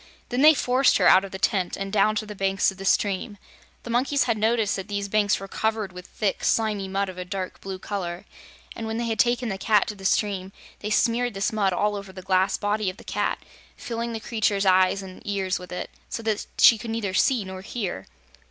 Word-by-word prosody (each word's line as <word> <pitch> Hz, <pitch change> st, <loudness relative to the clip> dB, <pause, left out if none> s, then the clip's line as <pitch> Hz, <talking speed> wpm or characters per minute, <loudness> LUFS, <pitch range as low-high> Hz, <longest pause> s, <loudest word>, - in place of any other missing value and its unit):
Then 250 Hz, +2 st, 0 dB
they 310 Hz, +1 st, +8 dB
forced 255 Hz, +1 st, +3 dB
her -, -, +2 dB
out 190 Hz, -, +7 dB
of 195 Hz, -, -6 dB
the 190 Hz, -, -6 dB
tent 190 Hz, -2 st, 0 dB
and 195 Hz, 0 st, -5 dB
down 215 Hz, +1 st, +3 dB
to 215 Hz, -, -2 dB
the 210 Hz, -, -7 dB
banks 195 Hz, -1 st, +1 dB
of 190 Hz, -, -14 dB
the 195 Hz, -, -7 dB
stream. 205 Hz, +2 st, +1 dB, 0.5 s
The 240 Hz, -, -6 dB
monkeys 265 Hz, +4 st, +2 dB
had 230 Hz, -, +1 dB
noticed 220 Hz, -1 st, +1 dB
that 195 Hz, 0 st, -5 dB
these 200 Hz, -1 st, -3 dB
banks 205 Hz, 0 st, +2 dB
were 195 Hz, -, -7 dB
covered 220 Hz, -1 st, -1 dB
with 180 Hz, +1 st, -10 dB
thick, 205 Hz, -3 st, -2 dB
slimy 210 Hz, -3 st, +1 dB
mud 195 Hz, +1 st, -1 dB
of 185 Hz, -1 st, -8 dB
a -, -, -3 dB
dark 185 Hz, 0 st, -5 dB
blue 195 Hz, -1 st, -5 dB
color, 180 Hz, -3 st, -5 dB, 0.5 s
and 225 Hz, -, -5 dB
when 220 Hz, 0 st, -3 dB
they 235 Hz, -, -1 dB
had 225 Hz, -2 st, -2 dB
taken 240 Hz, +1 st, +2 dB
the 195 Hz, -1 st, -4 dB
Cat 210 Hz, -1 st, +3 dB
to 210 Hz, -, -5 dB
the 195 Hz, -, -13 dB
stream, 195 Hz, -1 st, 0 dB, 0.3 s
they 210 Hz, -, -4 dB
smeared 235 Hz, +1 st, +1 dB
this 195 Hz, +3 st, -1 dB
mud 200 Hz, -3 st, +2 dB
all 210 Hz, +3 st, 0 dB
over 200 Hz, -1 st, -7 dB
the 185 Hz, -1 st, -10 dB
glass 190 Hz, 0 st, +2 dB
body 205 Hz, -1 st, 0 dB
of 185 Hz, -, -8 dB
the -, -, -13 dB
cat, -, -, -2 dB, 0.3 s
filling 235 Hz, 0 st, -4 dB
the 225 Hz, -, -4 dB
creature's 215 Hz, -3 st, 0 dB
ears 185 Hz, +1 st, +4 dB
and 185 Hz, -1 st, -11 dB
eyes 195 Hz, -2 st, -1 dB
with 180 Hz, 0 st, -11 dB
it, 180 Hz, -, -5 dB, 0.2 s
so 230 Hz, -, -5 dB
that 215 Hz, -2 st, -1 dB
she 230 Hz, -, +7 dB
could 235 Hz, +1 st, -7 dB
neither 225 Hz, -4 st, -2 dB
see 235 Hz, +2 st, +2 dB
nor 190 Hz, 0 st, -7 dB
hear. 195 Hz, -, -5 dB
205 Hz, 235 wpm, -25 LUFS, 190-225 Hz, 0.5 s, they